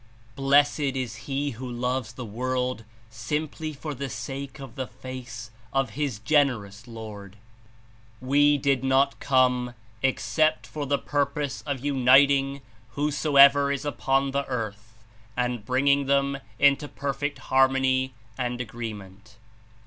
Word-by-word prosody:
Blessed 140 +2 +3 0.2
Is 125 -3 -3
he 140 +1 -1
who 125 +2 -7
loves 125 -1 -2
the 125 0 -7
world 125 +1 -2 0.3
simply 150 +7 -3
for 150 +1 -6
the 140 0 -5
sake 135 +5 -6
of 135 -4 -9
the 130 -2 -4
Face 125 -3 -8 0.2
of 135 -3 0
his 140 -2 -2
Generous 115 -4 0
Lord." 105 -3 -9 0.8
91 130 - -11
We 145 +1 +5
did 135 -1 +1
not 135 +1 +2
come 125 -2 +2 0.3
except 120 0 +1
for 145 +5 -5
the 140 +1 +2
purpose 145 0 -2
of 140 -2 -3
unit 135 0 +6
ing 140 0 0 0.3
whosoever 140 -1 +5
is 140 +1 -3
upon 135 -1 0
the 140 0 -1
earth 110 -2 -6 0.3
and 125 -3 -1
bringing 140 +4 +2
them 140 0 +1 0.2
Into 140 +3 +4
perfect 145 0 -3 0.2
harmony 130 -1 +3 0.2
and 125 -1 -2
agreement." 110 -3 -8
130 Hz, 130 wpm, -26 LUFS, 120-140 Hz, 0.8 s, unit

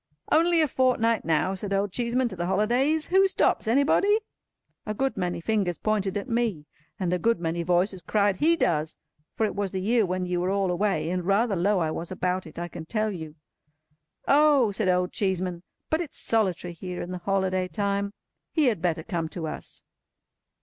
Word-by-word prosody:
"Only 335 +1 +4
a 310 - +3
fortnight 240 -4 +2
now," 165 +4 +1
said 195 +1 -5
Old 200 0 0
Cheeseman, 245 +3 0
"to 190 - -6
the 175 0 -3
holidays. 245 - +1
Who 385 +1 +5
stops? 380 - +1
Anybody?" 295 - +3 0.6
A 215 - -4
good 270 +4 0
many 180 -3 -2
fingers 190 -2 0
pointed 205 -3 -1
at 205 - -5
me, 230 -10 -1 0.3
and 180 -2 0
a 180 - 0
good 230 +1 +2
many 170 0 -2
voices 180 +2 +1
cried 200 +2 +1
"He 330 - +3
does!" 160 - 0 0.4
For 220 - +1
it 210 - -2
was 200 -2 -2
the 190 - -2
year 225 +4 +2
when 185 -1 -1
you 180 -1 -1
were 180 - 0
all 195 -2 +1
away; 190 -2 0
and 180 0 -1
rather 200 +3 +2
low 195 +4 +2
I 160 -3 0
was 165 +2 -5
about 185 -1 -2
it, 155 - -14
I 175 0 -3
can 160 -2 -9
tell 215 +1 0
you. 160 -5 -7 0.9
"Oh!" 285 -6 +5
said 200 -1 0
Old 180 0 +1
Cheeseman. 185 -3 -1 0.3
"But 315 +2 +2
it's 325 - -6
solitary 185 -6 0
here 180 +1 -6
in 175 - -7
the 180 - -4
holiday 185 0 0
time. 200 0 -2 0.4
He 310 -3 +2
had 210 -8 -3
better 165 -2 0
come 170 -4 -3
to 165 0 -5
us." 155 - -6
195 Hz, 195 wpm, -26 LUFS, 180-230 Hz, 0.9 s, Who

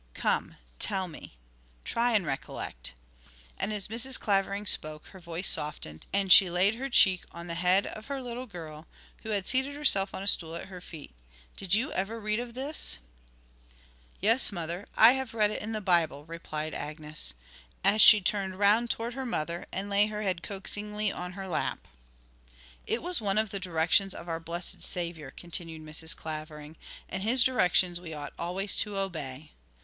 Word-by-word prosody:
Come, - - -1 0.2
tell 190 -1 +3
me; 155 - -12 0.5
try 240 +1 +1
and 205 -5 +2
recollect.' 60 - -3 0.7
And 215 - -2
as 210 -2 -2
Mrs. 240 +5 +1
Clavering 200 0 0
spoke 155 -5 +1
her 190 - -13
voice 170 +1 +1
softened, 80 - +2
and 195 -1 0
she 190 -1 +9
laid 180 +4 +2
her 265 +4 -5
cheek 190 -7 +4
on 170 0 -9
the 170 - -5
head 180 +3 +2
of 215 - -8
her 280 -1 -4
little 250 0 -6
girl, 160 -5 -9 0.3
who 220 - -8
had 200 -3 -1
seated 265 +2 +1
herself 200 -10 +4
on 190 - -5
a - - -5
stool 165 -4 +3
at 170 - -7
her 180 -2 -10
feet. 160 - -11 0.4
'Did 195 0 0
you 255 +8 -1
ever 205 +5 -3
read 215 +1 -1
of 240 -1 -7
this?' 270 - +1 1.2
'Yes, 225 +6 +3
mother, 175 +1 -5
I 235 - +9
have 265 -3 -4
read 210 -2 +3
it - - -4
in 215 - -5
the 215 -1 -3
Bible,' 170 -6 +1
replied 155 -1 -6
Agnes, 150 - -1 0.5
as 200 +3 +4
she 210 - +9
turned 190 -1 0
round 210 +4 +3
towards 230 +2 -2
her 265 - -4
mother, 170 -8 -4
and 195 +2 -4
laid 205 +1 +3
her 215 0 -5
head 185 -4 -2
coaxingly 210 +2 -2
on 180 0 -6
her 195 0 -7
lap. 175 - -3 1.0
'It 240 - -2
was 355 -5 0
one 200 -1 0
of 215 -2 +1
the 200 - -4
directions 180 +2 +1
of 170 - -9
our 165 -1 -3
blessed 170 +2 -3
Saviour,' 170 -5 -3
continued 165 0 -4
Mrs. 160 +1 0
Clavering, 155 -1 -8 0.3
'and 185 - -5
His 235 +4 +4
directions 180 -7 +2
we 160 -3 -8
ought 145 -1 -7
always 185 +4 -1
to 205 -2 -1
obey. 155 -7 -5
190 Hz, 180 wpm, -28 LUFS, 165-215 Hz, 1.2 s, she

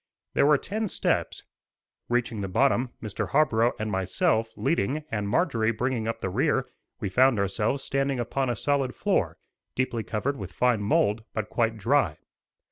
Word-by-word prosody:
There - - +4
were 150 -1 +6
ten 215 +8 -3
steps. - - -1 0.7
Reaching 120 -3 0
the 95 - -2
bottom, 130 +5 +2
Mr. 105 -2 -3
Harborough 120 -6 +3
and 110 0 -3
myself 95 +4 +1
leading 150 0 0
and 105 -2 -2
Marjorie 115 - +2
bringing 115 0 -1
up 115 - -3
the 95 - -1
rear, - - +1 0.3
we - - -2
found 125 +5 +4
ourselves 105 +7 0
standing 135 -1 0
upon 130 +2 -1
a 120 - 0
solid 135 0 0
floor, - - 0 0.4
deeply 125 -3 -1
covered 120 +6 -2
with 95 -3 -7
fine 125 -1 +2
mould, 105 +1 +2
but 110 -1 -3
quite 115 -2 +1
dry. 115 - +2
115 Hz, 160 wpm, -26 LUFS, 105-135 Hz, 0.7 s, were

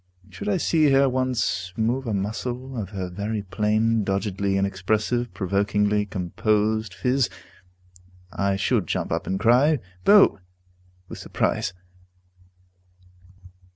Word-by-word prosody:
Should 205 - -5
I 195 - +2
see 155 -3 +3
her 135 0 +4
once 125 -8 -1
move 120 +4 0
a 110 - -1
muscle 120 +6 -4
of 105 -6 -4
her 95 -3 -4
very 100 +4 -4
plain, 110 +3 +1
doggedly 100 0 -1
inexpressive, 105 +5 -1
provokingly 105 +2 +1
composed 105 +3 0
phiz, 130 0 +1 1.0
I 100 -1 0
should 100 -1 0
jump - - -2
up - - -2
and 95 0 -1
cry, 125 +8 +4 0.3
"Bo!" 205 - +6 0.7
with - - -9
surprise. 90 - -1
110 Hz, 115 wpm, -24 LUFS, 100-125 Hz, 1.0 s, Bo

